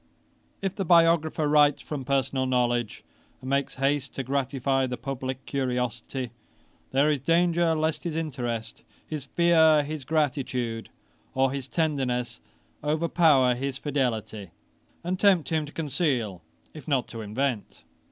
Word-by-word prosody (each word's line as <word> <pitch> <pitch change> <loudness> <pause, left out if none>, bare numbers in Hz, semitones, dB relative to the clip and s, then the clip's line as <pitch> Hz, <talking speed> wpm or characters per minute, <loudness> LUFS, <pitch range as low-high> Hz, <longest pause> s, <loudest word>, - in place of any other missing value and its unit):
] - - -39
'If 195 -1 -1
the 195 - -2
biographer 165 -3 +4
writes 145 -1 +4
from 145 -4 -5
personal 135 -1 0
knowledge, 120 -3 0 0.4
and 130 - -10
makes 140 +1 0
haste 140 +1 0
to 135 - -2
gratify 135 0 0
the 125 0 -4
publick 130 -1 -5
curiosity, 125 -2 -2 0.6
there 140 +3 +3
is 145 - 0
danger 170 +2 +2
lest 155 0 -1
his 170 -3 -3
interest, 120 -8 -4 0.3
his 150 -4 -5
fear, 160 -3 +4
his 150 -1 -5
gratitude, 130 -6 -1 0.5
or 130 0 +3
his 135 -1 -4
tenderness 130 -7 -1 0.4
overpower 155 -4 +3
his 130 +2 -3
fidelity, 110 - -2 0.5
and 180 +2 -2
tempt 190 -6 +4
him 155 -2 0
to - - -10
conceal, 135 - -1 0.3
if 155 - -11
not 135 -5 +1
to 115 - -7
invent. 115 +2 -3
140 Hz, 135 wpm, -26 LUFS, 125-155 Hz, 0.6 s, biographer